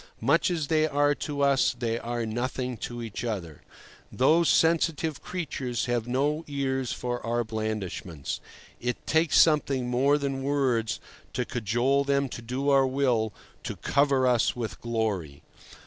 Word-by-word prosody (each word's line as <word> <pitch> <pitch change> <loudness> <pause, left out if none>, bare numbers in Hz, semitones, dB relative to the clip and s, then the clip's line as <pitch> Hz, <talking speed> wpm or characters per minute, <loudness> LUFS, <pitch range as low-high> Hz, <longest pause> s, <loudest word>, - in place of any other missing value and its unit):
Much - - +3
as 165 -4 -1
they 155 +1 +2
are 145 0 +2
to 145 0 -4
us, 140 -2 +3
they 115 -1 -1
are 120 -1 -3
nothing 125 +2 -2
to 120 +1 -6
each 115 0 -5
other. 95 -10 -4 0.5
Those 160 +6 +4
sensitive 160 -2 +2
creatures 135 -9 -3
have 120 -2 -1
no 145 +5 0
ears 135 -3 -1
for 120 0 -3
our 120 +1 0
blandishments. 110 -8 -4 0.4
It 125 0 -3
takes 160 0 +3
something 140 -5 +4
more 135 +4 +3
than 135 -2 -2
words 135 -5 0 0.3
to - - -1
cajole 120 +5 +1
them 140 -1 +1
to 120 - -7
do 130 +4 -2
our 135 -1 +5
will, 125 -5 +1 0.3
to - - -5
cover 140 -2 +2
us 125 -2 +3
with 110 -7 -5
glory. 105 -11 -2
130 Hz, 145 wpm, -27 LUFS, 115-140 Hz, 0.5 s, our